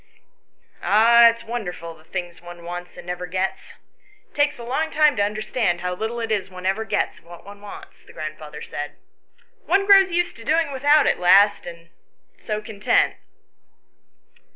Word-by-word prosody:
"Ah, 235 +3 +6
it's 230 0 -5
wonderful 185 -8 -6
the 155 -1 -20
things 175 0 -6
one 175 0 -12
wants 175 +1 -8
and 175 - -10
never 180 0 -5
gets. 190 +2 -3 0.5
It - - -38
takes 290 0 +1
a 240 - -9
long 270 +7 -2
time 305 -3 +3
to - - +1
understand 210 -3 -1
how 180 0 -2
little 220 +5 -4
it 225 -1 -3
is 200 -2 -1
one 185 0 -10
ever 195 +4 0
gets 210 0 -2
of - - -30
what 175 +1 -13
one 200 0 -12
wants," 385 - -12
the - - -17
grandfather - - -8
said. - - -6 0.4
" - - -37
One 395 +2 +2
grows 390 -1 +6
used 350 0 0
to 230 - -11
doing 315 +3 +1
without 290 +2 +3
at - - +1
last 195 +3 +4
and 170 -1 -11 0.5
so 215 0 -4
content." 210 -1 +1
210 Hz, 175 wpm, -22 LUFS, 180-255 Hz, 0.5 s, Ah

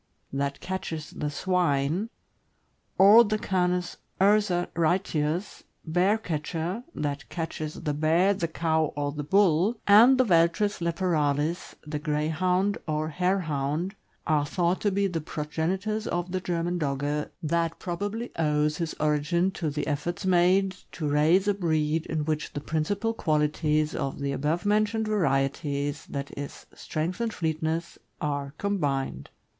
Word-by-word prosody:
"that 140 0 -2
catches 165 -4 -4
the 150 - -3
swine," 175 +2 0 0.9
or 205 +5 +9
the 215 -1 0
Canis 180 -2 0 0.2
ursaritius 175 -3 +1 0.2
(bear 180 +6 +2
catcher), 170 +3 -3
"that 140 -4 -3
catches 160 -2 -4
the 150 -2 0
bear, 165 +6 +3
the 190 -4 -2
cow, 160 -1 +1
or 145 -1 -1
the 145 +1 -5
bull," 190 - +3
and 230 +6 +7
the 255 - +5
Veltris 180 +1 +2
leporalis 165 -2 0
(the 150 0 -4
Greyhound 170 +6 0
or 155 0 -1
Harehound), 165 -1 -1 0.3
are 155 -2 +2
thought 175 +4 0
to 205 - +2
be 200 +1 +1
the 175 -4 -1
progenitors 180 +9 -2
of 175 +1 -2
the 185 0 -1
German 175 0 -1
Dogge, 145 0 -1
that 165 +1 0
probably 205 +7 -4
owes 150 -1 +1
his 165 -2 -3
origin 155 +5 +1
to 165 -4 -3
the 150 +1 -3
efforts 160 +6 -3
made 185 +1 +4 0.2
to 155 - -3
raise 155 +7 +3
a 205 - +4
breed 160 -4 0
in 155 -2 -2
which 155 -1 -2
the - - -3
principal 195 +10 -1
qualities 155 -3 +1
of 135 - -3
the 140 0 -1
above 150 +6 -1
mentioned 215 +1 +1
varieties, 145 -5 0
i. 140 -1 -3
e., 145 0 -4 0.3
strength 170 +7 -3
and 230 -1 0
fleetness, 160 -1 -2 0.2
are 140 -1 -3
combined. 140 - -2
165 Hz, 135 wpm, -27 LUFS, 150-190 Hz, 0.9 s, or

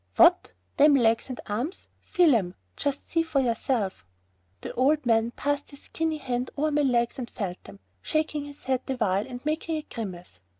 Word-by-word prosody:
"What, - - +5 0.3
them 295 0 +7
legs 230 -1 +2
and 255 - -5
arms? 240 - -4
Feel 350 -7 +3
'em. 185 -6 0 0.2
Just 285 0 -2
see 330 - +1
for 320 -4 0
yourself." 230 -4 -1 0.6
The - - -6
old 285 +3 +2
man 225 -1 +3
passed 285 +3 -2
his 280 - -14
skinny 320 -1 -2
hand 250 -3 -2
over 305 +2 +1
my 295 0 +2
legs 240 -3 +1
and 240 - -5
felt 190 -5 -5
them, 100 0 -12 0.2
shaking 305 -2 -1
his 285 0 -12
head 260 -1 0
the 265 - -1
while 200 -2 +1
and 250 +1 -8
making 315 +1 -1
a 305 - -5
grimace. 180 - -8
260 Hz, 185 wpm, -27 LUFS, 225-295 Hz, 0.6 s, them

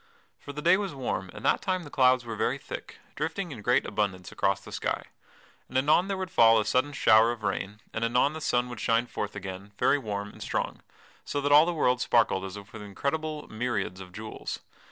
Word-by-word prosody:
For 145 - -8
the 150 +1 -7
day 175 +2 +6
was 195 -6 -3
warm 120 -8 -3
and - - -9
that - - +3
time 185 -2 -1
the 145 - -11
clouds 130 -1 +4
were 115 -1 -4
very 115 +5 0
thick, - - -8 0.2
drifting - - -3
in - - -7
great - - +2
abundance 95 -4 -2
across - - +1
the - - -13
sky. - - -2 0.7
And 130 - -1
anon 155 +7 +4
there 195 -1 -2
would 185 -1 -4
fall 115 -1 +6
a 105 - 0
sudden 130 +3 +1
shower 115 -4 +5
of 115 -2 -7
rain, 100 +1 -3
and 110 - -2
anon 125 +5 +2
the 160 - -6
sun 125 -3 +1
would 120 -3 -7
shine 115 +1 +2
forth 105 -3 -5
again, 100 +1 -7
very 145 - +3
warm 105 -4 -4
and - - -15
strong, - - -2 0.4
so 145 - -2
that 145 +1 0
all 150 +3 +8
the - - +2
world 125 -7 +2
sparkled 110 -6 +2
as 95 +1 -7
with 100 0 -12
incredible 150 +9 -3
myriads 110 -5 -2
of 90 -1 -10
jewels. 110 +4 -6
120 Hz, 215 wpm, -28 LUFS, 105-145 Hz, 0.7 s, all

